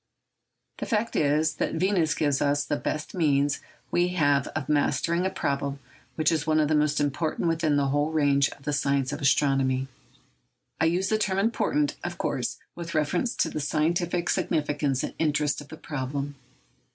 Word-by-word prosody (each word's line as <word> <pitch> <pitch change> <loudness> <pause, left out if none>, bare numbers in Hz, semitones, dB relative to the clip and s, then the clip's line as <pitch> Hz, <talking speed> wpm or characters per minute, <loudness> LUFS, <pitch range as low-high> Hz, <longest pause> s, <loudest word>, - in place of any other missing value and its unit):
The - - -4
fact 225 +1 0
is, 150 +1 +2
that - - -1
Venus 175 -2 +2
gives 145 -3 +1
us 145 0 +1
the - - -1
best 150 +1 -3
means 145 -4 +2 0.3
we 175 0 +3
have 145 -5 +3
of 150 -3 -3
mastering 150 +4 +1
a - - 0
problem 140 -6 -2 0.4
which 155 +2 +2
is 160 -2 -1
one 155 0 +3
of 150 -1 +2
the - - +2
most 150 0 +2
important 150 +4 -1
within 165 -2 +1
the 140 -1 +2
whole 145 +2 +1
range 140 -3 +3
of 140 - -14
the 150 +1 -2
science 140 -2 +1
of 145 - -5
astronomy. 135 -2 +2 0.9
I 160 - +3
use 180 +4 +1
the 215 - +2
term 195 -3 0
important, 260 +8 +1
of - - -4
course, - - -2 0.2
with 170 -1 -7
reference 175 +10 0
to - - +1
the - - -3
scientific 170 +4 0
significance 145 -4 0
and - - -4
interest 150 -2 +1
of 145 - -12
the 160 - -10
problem. 140 -1 -4
150 Hz, 175 wpm, -26 LUFS, 145-165 Hz, 0.9 s, we